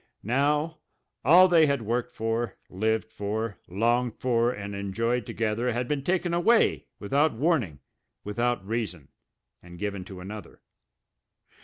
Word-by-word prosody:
Now, 150 +7 +1 0.4
all 175 +7 +8
they 165 -3 +5
had 140 -4 0
worked 120 +3 -1
for, 115 -1 -2
lived 110 +3 -1
for, 105 +1 -3
longed 120 +5 +1
for, 120 -1 +2
and 100 -4 -6
enjoyed 110 +4 -1
together 115 +2 -1
had 120 +1 -2
been 145 -1 -1
taken 175 +1 0
away, 220 +7 +3
without 140 +9 +1
warning, 125 - 0 0.4
without 120 0 -1
reason, 105 - -3 0.5
and 85 0 -12
given 100 0 -3
to 95 -2 -9
another! 100 +1 -9
115 Hz, 130 wpm, -27 LUFS, 105-140 Hz, 0.5 s, all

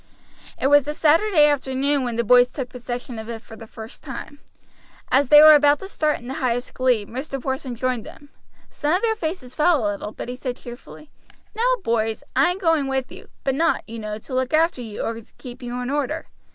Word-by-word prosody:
It - - -2
was 290 0 +5
a 300 - -3
Saturday 325 +1 +4
afternoon 280 -1 +1
when 240 -2 -3
the 235 - 0
boys 245 +2 +6
took 255 -2 -5
possession 245 -1 -6
of 220 +1 -8
it 225 -1 -6
for 225 - -12
the 225 0 -11
first 220 +1 -11
time. 280 +1 -8 0.7
As 270 0 +3
they 295 0 +9
were 310 0 +10
about 290 0 +5
to 385 - -6
start 305 -6 0
in 240 - -12
the 265 - -4
highest 245 -1 -1
glee, 250 -5 +1
Mr. 270 +5 -5
Porson 265 -1 -4
joined 250 -1 -1
them. 290 - -13 0.4
Some 295 +1 -1
of 375 - -1
their 445 -1 +2
faces 315 - -5
fell 305 -6 +2
a 205 - +1
little; 205 +1 -6
but - - -7
he 245 - -5
said 250 -1 -4
cheerfully: 245 +4 -12 0.4
"Now, - - +2
boys, 225 0 -1
I - - +4
am 360 - -2
going 325 -6 +1
with 265 -1 -2
you; - - -12 0.2
but 270 - +1
not, 330 +4 +1
you 230 0 -7
know, 210 -1 -5
to 220 - -11
look 260 +3 +1
after 325 -4 +2
you 220 -3 -6
or 225 0 -3 0.2
keep 245 0 -10
you 245 0 -5
in 250 +2 -3
order. 295 +2 -2
265 Hz, 220 wpm, -22 LUFS, 240-295 Hz, 0.7 s, were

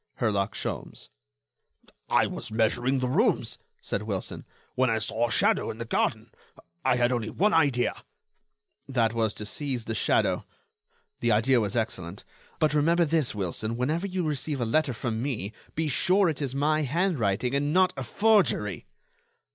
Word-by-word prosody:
—Herlock 100 -4 0
Sholmes." - - -5 1.0
"I - - +4
was - - -6
measuring 120 +4 +1
the 125 - 0
rooms," 125 - +1 0.2
said 100 - -2
Wilson, 100 -3 -4 0.3
"when 130 0 +2
I 115 - +1
saw 110 +2 0
a - - -6
shadow - - +2
in - - -5
the 115 - -5
garden. - - -1 0.5
I - - +3
had 120 0 +2
only 115 -3 -1
one 205 - +1
idea——" 140 -6 +3 1.0
"That 120 -4 +1
was 115 -2 +1
to 105 - -5
seize 125 +2 -3
the 115 - -3
shadow.... - - +1 0.8
The 120 - +1
idea 120 +3 +3
was 105 +2 -2
excellent.... 95 -5 -3 0.3
But 155 -1 +2
remember 165 +3 +3
this, 155 -7 +1
Wilson, 105 +4 -2
whenever 155 +10 -1
you 185 -1 -2
receive 150 -2 -2
a 120 - 0
letter 135 +4 +1
from 115 -1 -3
me, 110 -6 -3 0.2
be 160 0 0
sure 185 +6 +3
it 155 -2 -4
is 135 -2 -2
my 155 +2 +2
handwriting 135 - 0
and 145 +1 +1
not 185 +1 +4
a 130 - -4
forgery." 130 - +2
125 Hz, 165 wpm, -27 LUFS, 110-150 Hz, 1.0 s, I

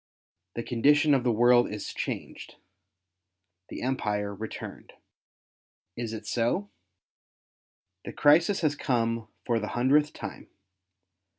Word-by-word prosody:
The 115 - -3
condition 145 +6 +3
of 135 -3 +2
the 125 - +2
world 120 +2 +4
is 105 -1 -5
changed - - -6 0.6
— 90 +1 -57
the - - -7
Empire 105 -6 -1
returned. 110 +3 -8 1.0
Is 115 -2 -4
it 110 - -7
so? 125 - -1 1.3
The - - -5
crisis 165 +7 +4
has 155 -3 +2
come 115 -4 -1 0.2
for 120 -2 +1
the 105 - -4
hundredth 145 +5 +3
time. - - -8
120 Hz, 115 wpm, -27 LUFS, 105-140 Hz, 1.3 s, world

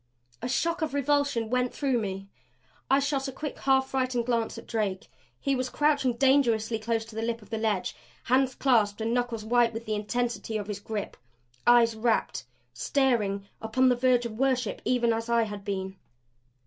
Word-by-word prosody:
A - - -3
shock 335 +7 0
of 310 -3 -1
revulsion 285 -5 +1
went 250 0 +1
through 270 -4 +1
me. 195 -2 -4 0.6
I 270 - +5
shot 280 -1 0
a - - -4
quick, 295 +3 -6
half 265 -1 +2
frightened 255 -3 0
glance 230 -2 -1
at - - -9
Drake. 205 -5 -2 0.3
He 275 - 0
was 255 0 -2
crouching 285 -4 +2
dangerously 235 -4 +2
close 225 0 -1
to 225 -1 -13
the 225 - -2
lip 230 -1 -2
of - - -19
the 225 - -2
ledge, 215 -4 -1 0.3
hands 260 +1 +2
clasped 220 -6 +2
and 225 +1 -1
knuckles 240 -3 -1
white 235 0 +3
with 225 +1 -6
the 215 - -2
intensity 220 0 -2
of 205 - -4
his 205 -1 -5
grip, 205 0 -5 0.5
eyes 235 -1 +6
rapt, 220 - 0 0.3
staring 205 - 0
upon 255 +4 +2
the 250 - +3
verge 245 -1 +2
of 225 -1 -6
worship 255 -4 0
even 240 -2 +2
as 225 +1 -3
I 235 -1 +3
had 205 -2 -6
been. 190 -1 -4
235 Hz, 185 wpm, -28 LUFS, 220-260 Hz, 0.6 s, eyes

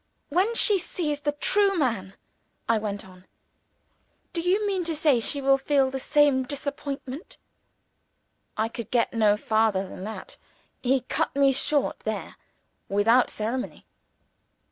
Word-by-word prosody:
"When 380 +9 +1
she 415 -3 +7
sees 305 -4 -3
the 290 0 -1
true 390 +6 +3
man," 215 - -1 0.5
I 230 -1 +2
went 205 -2 -5
on, 185 0 -18 1.1
"do 335 - -1
you 380 +5 +1
mean 385 -3 -1
to 325 -1 -2
say 295 -5 +3
she 280 +5 -2
will 270 0 +4
feel 270 -1 +1
the 265 - -4
same 290 -1 +3
disappointment 280 +1 -6 0.6
?" - - -48
I 220 +1 +1
could 230 -1 -8
get 240 -2 0
no 215 -2 +3
farther 215 -3 0
than 185 - -9
that. 220 - -8 0.4
He 260 +1 +1
cut 255 - -2
me 275 -1 +4
short 280 +2 -1
there, - - -5 0.5
without 225 +5 +3
ceremony. 235 +4 -5
270 Hz, 145 wpm, -25 LUFS, 220-295 Hz, 1.1 s, she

